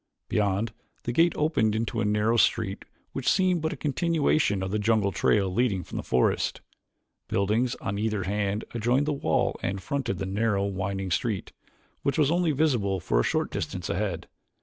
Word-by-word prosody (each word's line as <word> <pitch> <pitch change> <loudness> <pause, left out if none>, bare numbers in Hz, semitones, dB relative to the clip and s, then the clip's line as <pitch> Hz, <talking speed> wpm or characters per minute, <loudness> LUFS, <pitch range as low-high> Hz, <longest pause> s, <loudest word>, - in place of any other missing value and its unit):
Beyond, 105 +1 0 0.3
the 120 - -2
gate 165 +7 +4
opened 115 -9 +1
into 115 +1 -1
a - - +1
narrow 105 +2 +2
street 110 -3 +1 0.3
which 135 - -1
seemed 185 -3 +2
but 160 +1 -1
a - - -5
continuation 150 - +1
of 95 - -3
the 105 - 0
jungle 105 -2 +2
trail 100 0 +2
leading 100 -5 +1
from - - -7
the - - -3
forest. 65 - +1 0.7
Buildings 110 +5 +1
on 100 +1 -4
either 105 -2 0
hand 100 +2 -1
adjoined 120 +5 +1
the 150 - 0
wall 140 - 0
and 95 +1 -2
fronted 120 0 -2
the 95 - -3
narrow, 100 +1 0
winding 95 -1 -3
street, 105 +2 -1 0.5
which 140 - 0
was 150 -1 +3
only 175 -1 +2
visible 125 -11 +1
for - - +1
a - - +3
short - - 0
distance 90 -2 -3
ahead. 90 -3 -2
110 Hz, 175 wpm, -27 LUFS, 100-130 Hz, 0.7 s, gate